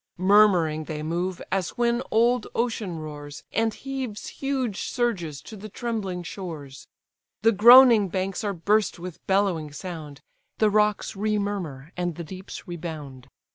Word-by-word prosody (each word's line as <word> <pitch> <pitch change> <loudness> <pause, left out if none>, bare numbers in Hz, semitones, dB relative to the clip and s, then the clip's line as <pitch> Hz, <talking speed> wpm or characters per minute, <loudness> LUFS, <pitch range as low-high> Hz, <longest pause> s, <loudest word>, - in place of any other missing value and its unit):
Murmuring 180 -5 +4
they 150 -1 -5
move, 175 +3 -2
as 190 -3 -1
when 240 0 +2
old 240 +3 +2
ocean 220 -7 -1
roars, 150 -2 -8
And 225 +1 +2
heaves 260 -3 -5
huge 260 -7 -2
surges 185 - -2
to 220 - -10
the 215 +1 -9
trembling 205 -5 -3
shores; 160 -6 -8 0.6
The 225 - +6
groaning 230 0 +8
banks 190 +2 -2
are 205 - 0
burst 205 +4 +1
with 175 -1 -9
bellowing 190 -6 +1
sound, 155 -3 -8 0.4
The 215 -1 +3
rocks 210 0 +1
remurmur 200 -8 -2
and 175 -2 -2
the 170 - -6
deeps 185 +5 -9
rebound. 155 -7 -7
190 Hz, 135 wpm, -25 LUFS, 160-215 Hz, 0.6 s, groaning